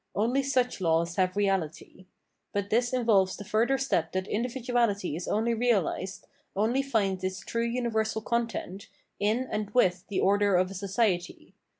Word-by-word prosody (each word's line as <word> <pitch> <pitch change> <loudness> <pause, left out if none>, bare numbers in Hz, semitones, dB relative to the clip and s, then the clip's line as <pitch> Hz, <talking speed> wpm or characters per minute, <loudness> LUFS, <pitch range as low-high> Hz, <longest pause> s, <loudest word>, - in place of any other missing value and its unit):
Only 240 +6 +2
such 255 -5 0
laws 170 0 +1
have 185 0 +1
reality. 185 -2 -2 0.5
But 200 0 -2
this 240 +2 +2
involves 220 -7 +2
the - - -7
further 230 +6 +2
step 175 -12 0
that 185 0 -1
in 215 - -1
dividuality 235 - 0
is 175 - -5
only 225 +2 +1
realised, 205 -5 0 0.3
only 225 +7 +2
finds 200 -8 0
its 185 0 -3
true 230 0 -2
universal 220 -2 -1
content, 230 -5 -3 0.3
in 220 +5 +1
and 210 -1 -2
with 180 -6 +3
the 200 - -2
order 200 0 +3
of 185 +1 +2
a - - -6
society. 195 -2 -1
205 Hz, 160 wpm, -28 LUFS, 185-235 Hz, 0.5 s, with